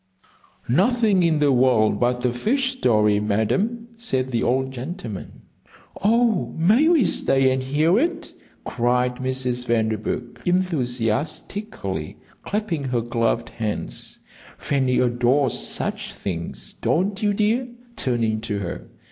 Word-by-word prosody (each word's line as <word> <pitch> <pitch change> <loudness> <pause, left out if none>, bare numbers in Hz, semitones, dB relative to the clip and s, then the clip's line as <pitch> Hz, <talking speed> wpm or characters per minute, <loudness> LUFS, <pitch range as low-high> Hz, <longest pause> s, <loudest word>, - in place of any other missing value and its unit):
"Nothing 205 - +3
in 165 -2 +3
the 145 -1 +3
world 125 -4 +3
but 125 +1 +1
a 120 - +1
fish 260 - 0
story, 105 - +2
Madam," 195 - 0
said 130 - -1
the 115 - 0
old 130 +1 +1
gentleman. 130 - -7 0.6
"Oh, 220 - +2
may 215 - +4
we 325 - +4
stay 135 -5 +2
and 130 0 0
hear 155 - +2
it?" 330 +3 -2 0.3
cried 125 +1 0
Mrs. 130 -1 -1
Vanderburgh, 110 +1 -1
enthusiastically, 145 - -2 0.2
clasping 190 -9 -2
her 125 -2 0
gloved 115 0 -1
hands. 110 -2 -4 0.4
"Fanny 130 -3 0
adores 125 +2 +2
such - - -4
things, 85 -9 -5
don't 195 +5 0
you, 210 -1 +2
dear?" 220 +5 +1 0.3
turning 115 - 0
to 105 -2 -3
her. 90 -4 -5
130 Hz, 120 wpm, -23 LUFS, 120-195 Hz, 0.6 s, may